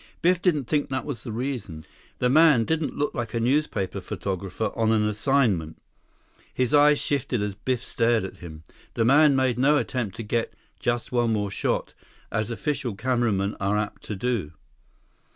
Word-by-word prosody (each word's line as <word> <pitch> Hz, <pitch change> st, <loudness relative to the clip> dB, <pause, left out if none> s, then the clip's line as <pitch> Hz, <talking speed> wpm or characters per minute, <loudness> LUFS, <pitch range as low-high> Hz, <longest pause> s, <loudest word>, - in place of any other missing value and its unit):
Biff 180 Hz, +1 st, +3 dB
didn't 160 Hz, -7 st, +2 dB
think 145 Hz, +4 st, 0 dB
that 130 Hz, -1 st, -2 dB
was 135 Hz, -7 st, -5 dB
the 115 Hz, -, -6 dB
reason. 110 Hz, -, -4 dB, 0.3 s
The 125 Hz, -, +1 dB
man 150 Hz, -3 st, +5 dB
didn't 160 Hz, +1 st, -1 dB
look 145 Hz, -, -1 dB
like 120 Hz, -2 st, -4 dB
a -, -, +1 dB
newspaper 120 Hz, -5 st, 0 dB
photographer 100 Hz, +2 st, -3 dB
on 110 Hz, -1 st, +2 dB
an 105 Hz, -1 st, +2 dB
assignment. 105 Hz, -, +1 dB, 0.7 s
His 125 Hz, 0 st, -1 dB
eyes 145 Hz, 0 st, +6 dB
shifted 135 Hz, -5 st, -1 dB
as 105 Hz, -1 st, -2 dB
Biff 120 Hz, +4 st, -2 dB
stared 115 Hz, -2 st, +1 dB
at 95 Hz, -, -8 dB
him. 80 Hz, -2 st, -10 dB, 0.3 s
The 115 Hz, -, +2 dB
man 145 Hz, +3 st, +6 dB
made 130 Hz, -2 st, +1 dB
no 145 Hz, +3 st, +4 dB
attempt 120 Hz, -8 st, -2 dB
to 115 Hz, -, -5 dB
get 115 Hz, +2 st, -2 dB, 0.2 s
"just 120 Hz, 0 st, -1 dB
one 120 Hz, -2 st, +2 dB
more 105 Hz, -2 st, -1 dB
shot," -, -, -2 dB, 0.4 s
as 110 Hz, 0 st, -1 dB
official 130 Hz, -1 st, -2 dB
cameramen 115 Hz, -4 st, 0 dB
are 100 Hz, +2 st, +1 dB
apt 105 Hz, -1 st, -3 dB
to 105 Hz, -, -4 dB
do. 100 Hz, -7 st, -2 dB
120 Hz, 170 wpm, -25 LUFS, 105-135 Hz, 0.7 s, eyes